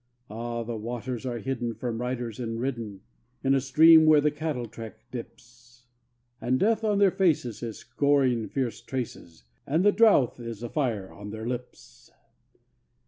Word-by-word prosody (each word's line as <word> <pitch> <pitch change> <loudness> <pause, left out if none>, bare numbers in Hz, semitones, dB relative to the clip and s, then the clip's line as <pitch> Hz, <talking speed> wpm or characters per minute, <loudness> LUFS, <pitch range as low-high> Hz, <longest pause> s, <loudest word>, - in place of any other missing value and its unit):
Ah! 115 +1 -4
the 115 0 -5
waters 120 +3 -5
are 120 -1 -2
hidden 120 -1 -3
from 115 +1 -4
riders 125 -2 -3
and 115 -2 -3
ridden 115 -6 -4 0.4
In 135 0 +3
a 135 - +3
stream 160 +4 +7
where 155 -1 +7
the 150 +1 +2
cattle 150 -5 -3
track 110 0 -9
dips; 120 0 -11 0.6
And 130 +2 +1
Death 225 +2 +2
on 210 -2 +2
their 200 -2 +5
faces 155 - +1
is 115 -3 -5
scoring 135 -6 +1
fierce 120 -5 -3
traces, 120 - -6 0.2
And 160 +7 +1
the 205 - +7
drouth 205 - +4
is 115 -1 -7
a 120 - -4
fire 115 -10 -2
on 105 +1 -9
their 110 +1 -6
lips. 120 - -7
120 Hz, 160 wpm, -27 LUFS, 115-140 Hz, 0.6 s, stream